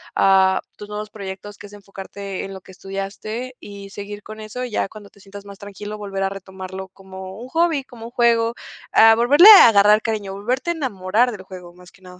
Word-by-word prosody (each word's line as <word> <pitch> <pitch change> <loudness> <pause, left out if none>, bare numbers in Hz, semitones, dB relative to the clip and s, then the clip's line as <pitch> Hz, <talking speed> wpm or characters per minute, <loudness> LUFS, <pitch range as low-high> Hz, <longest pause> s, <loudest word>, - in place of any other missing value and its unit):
ah, 190 -1 +4 0.2
tus 205 - -10
nuevos 210 0 -6
proyectos 200 0 -9
que 205 - -11
es 205 - -18
enfocarte 195 -1 -8
en 195 - -7
lo 190 - -8
que 190 - -16
estudiaste 200 +6 -6
y 200 -1 -11
seguir 205 +1 -8
con 215 0 -10
eso 215 +4 -6
y 245 - -8
ya 200 - -1
cuando 205 -1 -13
te 200 - -22
sientas 200 +1 -12
más 200 -1 -11
tranquilo, 205 +1 -8
volver 195 -2 -4
a 195 - 0
retomarlo 190 0 -9
como 190 0 -11
un 245 - -9
hobby, 325 -2 +1
como 230 -3 -12
un - - -13
juego, 235 -1 +2 0.4
ah, 225 0 +7
volverle 285 - +6
a 390 - +10
agarrar 210 0 +5
cariño, 210 -4 -4
volverte 250 - -2
a - - -1
enamorar 240 - 0
del 195 -3 -9
juego, 180 -2 -12
más 180 0 -17
que - - -24
nada. 180 0 -14
205 Hz, 215 wpm, -20 LUFS, 195-225 Hz, 0.4 s, a